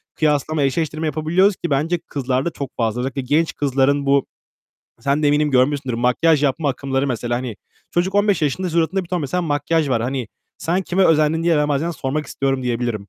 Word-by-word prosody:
kıyaslama, 150 0 +1
eşleştirme 155 +3 -1
yapabiliyoruz 165 +7 +2
ki 170 - -4
bence 150 +5 +1
kızlarda 135 +2 -1
çok 140 -4 -6
fazla. 115 0 0
Özellikle 135 +1 -3
genç 150 +6 0
kızların 140 0 +1
bu, 140 0 +3 0.8
sen 140 +4 0
de - - +3
eminim 150 +1 +2
görmüşsündür, 135 -1 +1
makyaj 130 +6 +2
yapma 145 +2 +1
akımları 135 0 -1
mesela, 120 -1 -2
hani, 120 -4 -5 0.3
çocuk 180 +3 0
15 205 -4 +2
yaşında 175 +5 0
suratında 170 +3 0
bir - - -16
ton 180 -2 -1
mesela 165 +6 -1
makyaj 155 0 0
var. 115 -3 +1
Hani 125 -2 -3 0.3
"Sen 175 +4 0
kime 185 +1 +1
özendin?" 160 0 +3
diye 170 -2 +3
ben 150 0 +1
bazen 150 +4 0
sormak 150 -1 -3
istiyorum 135 0 -1
diyebilirim. 120 -4 -2
145 Hz, 185 wpm, -20 LUFS, 130-165 Hz, 0.8 s, bu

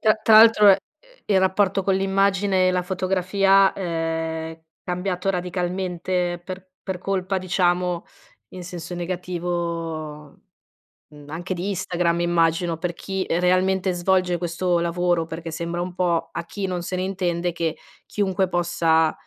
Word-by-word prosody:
tra 215 -1 +4
tra 220 -1 +6
l'altro, 220 -2 +7
ehm, 190 - +6 0.5
il 200 -2 +3
rapporto 190 +1 +2
con 195 0 +1
l'immagine 195 -1 +2
e - - +4
la 180 0 +1
fotografia 190 +1 +2
è 165 -2 -3 0.2
cambiato 180 +1 -3
radicalmente 180 -1 -2
per 185 +1 -8 0.2
per 190 -2 -4
colpa 190 0 -1
diciamo 180 -1 0 0.4
in 185 - -9
senso 175 0 -7
negativo, 170 -4 -4 0.7
mhmm, 145 -1 -14
anche 175 +4 -4
di 180 +2 -4
Instagram 175 -3 0
immagino, 165 -1 +1
per 175 0 -3
chi 190 +2 -4
realmente 185 +2 +2
svolge 180 0 +1
questo 175 0 0
lavoro, 170 0 0
perché 165 +1 -7
sembra 170 +1 -3
un 180 0 -4
po' 170 -3 0
a 170 - -5
chi 200 +2 -5
non 180 -1 -3
se 185 +1 -4
ne 185 - -1
intende 180 -2 -1
che 165 -2 -2 0.3
chiunque 190 -2 0
possa 165 -2 +2
180 Hz, 140 wpm, -23 LUFS, 170-190 Hz, 0.7 s, l'altro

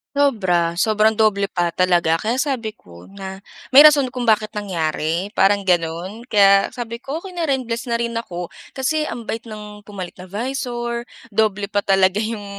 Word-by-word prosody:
Sobra, 185 -12 +1
sobrang 215 +2 +2
doble 200 -3 +2
pa 175 -2 -1
talaga. 175 -3 +2
Kaya 230 +4 -1
sabi 260 -5 -1
ko 85 -1 -15
na 195 -1 -8 0.3
may 275 - +11
rason 295 -2 +7
kung 245 -2 -1
bakit 215 0 +2
nangyari, 175 -1 -2
parang 200 -1 +3
gano'n. 175 +4 -1
Kaya 200 -2 +5
sabi 235 -2 -7
ko 275 +4 -4
okey 370 +2 -9
na 335 -3 -2
rin 265 -2 0
bless 235 +2 -4
na 235 - +1
rin 235 0 -2
ako. 180 -6 -4 0.3
Kasi 305 +3 0
ang 235 - -6
bait 225 +1 -4
ng 210 -1 -9
pumalit 200 -4 -8
na 185 - -12
visor, 240 +1 -3 0.3
doble 205 -1 +1
pa 205 0 -1
talaga 195 0 +2
yung 220 -2 -4
210 Hz, 175 wpm, -20 LUFS, 190-235 Hz, 0.3 s, may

